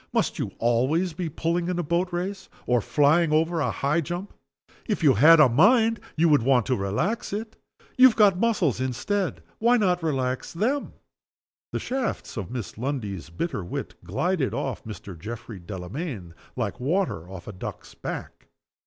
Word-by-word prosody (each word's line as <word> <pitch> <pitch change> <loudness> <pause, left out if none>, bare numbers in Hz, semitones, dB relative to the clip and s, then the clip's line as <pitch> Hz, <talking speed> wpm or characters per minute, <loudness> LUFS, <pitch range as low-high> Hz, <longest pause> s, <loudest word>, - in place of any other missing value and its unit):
"Must - - 0
you - - -2
always 130 +10 +1
be 165 0 -3
pulling 170 +3 -1
in 180 -1 -1
a 175 - 0
boat 175 +4 0
race, 190 +3 -4 0.2
or 120 -1 +2
flying 150 +6 +3
over 165 +2 +2
a 140 - +1
high 150 +5 0
jump? 175 +5 -5 0.5
If 210 -7 -1
you 140 -4 +6
had 160 +9 +7
a 150 - +8
mind, 220 - +4 0.2
you 165 +2 +3
would 150 -4 +5
want 125 -1 +3
to 130 - +1
relax 115 - -1
it. 215 +2 -4 0.4
You 260 - +11
have 245 - +1
got 200 -4 +5
muscles 190 - +1
instead. 130 - -2 0.2
Why 240 +2 +4
not 180 -5 +2
relax 130 -5 -2
them?" 250 +11 -1 0.8
The - - -2
shafts 260 -2 -3
of 100 -6 -4
Miss 120 -4 -6
Lundie's 110 - -3
bitter 95 - -3
wit 85 - -5
glided 135 - -1
off 130 -5 -3
Mr. 105 -3 -8
Geoffrey 110 +3 -8
Delamayn 95 - -6 0.2
like 110 -6 -3
water 135 - -1
off 95 -3 -9
a 105 - -6
duck's 90 - -8
back. - - -7
150 Hz, 170 wpm, -25 LUFS, 115-180 Hz, 0.8 s, You